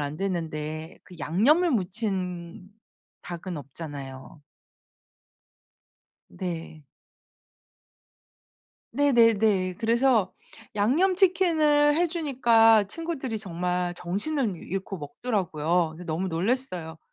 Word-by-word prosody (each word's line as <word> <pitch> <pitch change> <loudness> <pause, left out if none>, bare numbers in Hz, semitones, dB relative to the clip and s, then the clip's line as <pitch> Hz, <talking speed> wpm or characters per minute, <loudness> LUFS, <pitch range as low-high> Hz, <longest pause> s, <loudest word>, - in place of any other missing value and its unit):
안 145 +1 -3
됐는데 160 -3 -4
그 180 - -14
양념을 290 - +3
묻힌 185 -4 -3 0.5
닭은 175 0 -6
없잖아요. 140 -1 -9 1.9
네. 165 -4 -6 2.1
네네네. 220 -9 +3
그래서 230 -3 +2 0.4
양념치킨을 315 - +3
해주니까 250 - +4
친구들이 270 - -4
정말 180 -2 -2
정신을 205 - -2
잃고 195 +2 -5
먹더라고요. 165 - -1
그래서 180 - -10
너무 170 +3 -2
놀랐어요. 180 -3 -2
195 Hz, 200 characters per minute, -26 LUFS, 170-255 Hz, 2.1 s, 해주니까